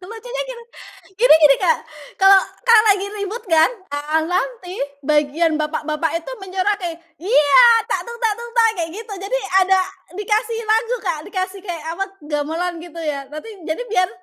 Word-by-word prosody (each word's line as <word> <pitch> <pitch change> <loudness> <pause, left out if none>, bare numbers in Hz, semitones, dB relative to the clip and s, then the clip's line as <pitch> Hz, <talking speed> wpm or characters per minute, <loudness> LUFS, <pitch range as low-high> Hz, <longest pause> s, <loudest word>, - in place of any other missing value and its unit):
Lucunya 485 +3 -5
gini. 485 -1 -8 0.6
Gini - - +7
gini 300 -3 +6
Kak, 335 -4 +3 0.4
kalau 390 0 +7 0.2
kalau 460 -2 +7
lagi 400 0 +3
ribut 425 +4 -5
kan, 325 -5 +4 0.2
ah 305 +2 -1
nanti 370 +2 -3 0.2
bagian 305 +2 +1
bapak-bapak 305 +1 -2
itu 335 +9 -6
menyoraki, 375 -2 -2 0.2
"Ya! 345 - +4 0.3
Tak - - -3
tung 470 - -7
tak 440 - +3
tung, 475 0 -8
tak!" 455 -1 +5
kayak 330 - -3
gitu, 445 -1 -8
jadi 450 +6 -2 0.3
ada 380 0 +4 0.4
dikasih 435 +3 -1
lagu 450 +3 +1
Kak, 345 -4 -1
dikasih 375 0 -4
kayak 345 -5 -6
apa 390 +4 -2 0.2
gamelan 320 +4 -3
gitu 335 -1 -10
ya, 280 -3 -4
nanti 305 +10 -9 0.2
jadi 315 +9 -2
biar 370 -6 +1
370 Hz, 160 wpm, -20 LUFS, 320-435 Hz, 0.6 s, Gini